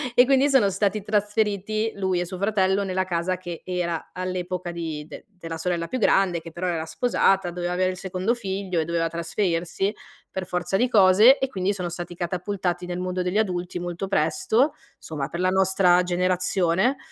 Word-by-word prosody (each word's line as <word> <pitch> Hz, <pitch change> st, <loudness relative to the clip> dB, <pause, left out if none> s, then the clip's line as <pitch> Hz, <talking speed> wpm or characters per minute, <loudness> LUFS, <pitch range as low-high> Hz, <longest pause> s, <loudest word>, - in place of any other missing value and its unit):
e 245 Hz, -, +7 dB
quindi 275 Hz, +2 st, +4 dB
sono 255 Hz, -8 st, +4 dB
stati 200 Hz, +2 st, 0 dB
trasferiti, 210 Hz, +1 st, 0 dB
lui 190 Hz, -2 st, 0 dB
e 175 Hz, -, -1 dB
suo 185 Hz, +1 st, -7 dB
fratello, 200 Hz, -1 st, +1 dB
nella 185 Hz, -1 st, -1 dB
casa 180 Hz, +1 st, -1 dB
che 175 Hz, -2 st, -7 dB
era 175 Hz, -3 st, -3 dB
all'epoca 180 Hz, -1 st, -3 dB
di 160 Hz, -3 st, -5 dB
de -, -, -11 dB
della 165 Hz, -5 st, -7 dB
sorella 170 Hz, 0 st, -2 dB
più 255 Hz, -, -3 dB
grande 190 Hz, -5 st, +3 dB
che 165 Hz, 0 st, -10 dB
però 180 Hz, +2 st, -4 dB
era 165 Hz, -2 st, -1 dB
sposata, 190 Hz, 0 st, +1 dB
doveva 175 Hz, 0 st, -3 dB
avere 185 Hz, +1 st, +1 dB
il 185 Hz, -, -8 dB
secondo 190 Hz, +4 st, -1 dB
figlio 190 Hz, -5 st, -3 dB
e -, -, -2 dB
doveva 165 Hz, 0 st, 0 dB
trasferirsi 170 Hz, +3 st, -1 dB, 0.4 s
per 190 Hz, -1 st, -4 dB
forza 180 Hz, +2 st, -1 dB
di 250 Hz, -, +2 dB
cose 210 Hz, +4 st, +6 dB
e 265 Hz, -, 0 dB
quindi 190 Hz, -2 st, -1 dB
sono 180 Hz, -3 st, -4 dB
stati 175 Hz, 0 st, -6 dB
catapultati 180 Hz, 0 st, -2 dB
nel 180 Hz, 0 st, -4 dB
mondo 185 Hz, 0 st, -2 dB
degli 180 Hz, +3 st, -1 dB
adulti 180 Hz, -4 st, -1 dB
molto 175 Hz, +2 st, -4 dB
presto, 220 Hz, -, +1 dB, 0.3 s
somma, 145 Hz, -4 st, -4 dB
per 170 Hz, -, -6 dB
la 185 Hz, -, +3 dB
nostra 190 Hz, -1 st, +4 dB
generazione. 180 Hz, +5 st, +1 dB
185 Hz, 180 wpm, -24 LUFS, 175-200 Hz, 0.4 s, e